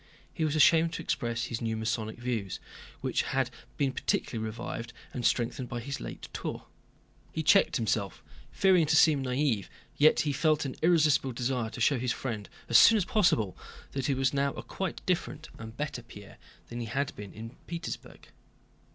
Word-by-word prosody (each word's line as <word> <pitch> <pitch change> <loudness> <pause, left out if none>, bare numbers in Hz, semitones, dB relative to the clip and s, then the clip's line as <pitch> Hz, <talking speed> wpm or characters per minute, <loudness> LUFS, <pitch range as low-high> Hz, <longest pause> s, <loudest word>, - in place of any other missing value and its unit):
He 165 - -2
was 155 -1 +1
ashamed 165 +2 +5
to 165 - -4
express 115 -5 -1
his 120 -1 -4
new 110 -1 -1
Masonic 110 0 -2
views, 120 -6 -3 0.4
which - - +1
had 130 -1 -1 0.3
been 140 -2 +1
particularly 115 -3 -1
revived 115 +1 -5 0.2
and 125 - -4
strengthened 120 +2 0
by 120 - -3
his 140 +4 -5
late - - -7
tour. - - -5 0.7
He 160 - -3
checked 195 +6 +5
himself, 110 -4 -1 0.3
fearing 185 -5 +4
to 160 - +3
seem 155 -4 +5
naïve, 125 -5 0 0.3
yet 155 +2 +5
he 145 -2 0
felt 155 +1 +2
an 135 - -3
irresistible 155 -6 +3
desire 120 -1 -1
to 120 - -9
show 130 +2 +3
his 125 -1 0
friend 110 -6 -5 0.2
as 120 - +7
soon 225 - +8
as 195 - +1
possible 175 - +2 0.4
that 135 -2 -2
he 140 - +1
was 135 0 +1
now 140 0 +1
a - - -7
quite 190 -3 -5
different, 180 -2 -2
and 110 +1 -9
better, 145 -4 -3
Pierre 105 -4 -13 0.3
than 120 - -5
he 115 - -4
had 135 +5 -2
been 100 -1 -8
in 115 +1 -8 0.2
Petersburg. 170 -1 -7
130 Hz, 180 wpm, -29 LUFS, 115-155 Hz, 0.7 s, soon